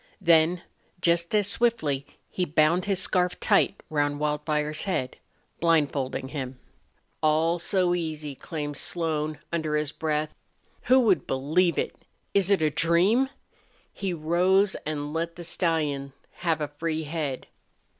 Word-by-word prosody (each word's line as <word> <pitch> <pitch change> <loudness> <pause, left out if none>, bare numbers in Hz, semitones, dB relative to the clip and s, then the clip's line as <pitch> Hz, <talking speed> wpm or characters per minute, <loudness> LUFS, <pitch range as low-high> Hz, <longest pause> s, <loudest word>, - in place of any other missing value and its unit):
Then, 170 -1 +4 0.4
just 170 +2 +1
as 210 -1 +3
swiftly, 160 - +1 0.2
he 185 - -2
bound 165 +2 +2
his 200 -1 +1
scarf 180 -1 0
tight - - +2
round 145 -2 0
Wildfire's 150 0 -1
head, 130 -10 -2 0.4
blindfolding 145 -5 +1
him. 130 -3 -5 0.6
"All 160 +2 +2
so 180 0 +1
easy!" 155 -4 -3
exclaimed 145 +1 -5
Slone, 155 -2 -1 0.2
under 155 -2 0
his 150 -1 -1
breath. 155 0 -2 0.5
"Who 260 +1 +6
would 210 -6 +2
believe 160 +7 +1
it! - - -1 0.4
Is 200 -1 +3
it 195 -5 +3
a 155 - +2
dream?" 180 - +3 0.6
He 195 -2 -3
rose 180 +5 +2
and 145 -1 -3
let 165 +1 -2
the 175 - -8
stallion 155 -5 -1 0.2
have 165 -3 0
a 150 - -1
free 160 +2 -3
head. 150 -4 -3
160 Hz, 135 wpm, -26 LUFS, 150-175 Hz, 0.6 s, Who